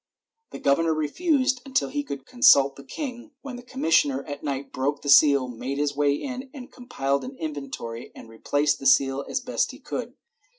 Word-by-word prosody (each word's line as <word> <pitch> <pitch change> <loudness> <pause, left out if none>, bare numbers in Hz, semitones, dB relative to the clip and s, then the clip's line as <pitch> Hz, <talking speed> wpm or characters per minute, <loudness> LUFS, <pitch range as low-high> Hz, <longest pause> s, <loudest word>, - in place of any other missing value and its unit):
The - - -8
governor 160 +3 +2
refused 255 - +1
until 265 -2 0
he 290 - -2
could 140 - -7
consult 140 - +5
the 140 - -12
king, 280 - -7
when 275 -3 -7
the 245 - -8
commissioner 275 +2 +1
at 145 -1 -7
night 140 -2 -4
broke 140 +3 -2
the 145 - -3
seal, 140 -2 +6
made 125 +3 -5
his 145 0 -1
way 145 0 +2
in, 260 - -6 0.2
compiled 140 - -2
an 260 +1 -8
inventory 135 -6 -6
and - - -12
replaced 145 +6 0
the 135 - -1
seal 135 +1 +3
as - - -1
best - - -1
he - - -9
could. - - -6
145 Hz, 180 wpm, -25 LUFS, -, 0.2 s, seal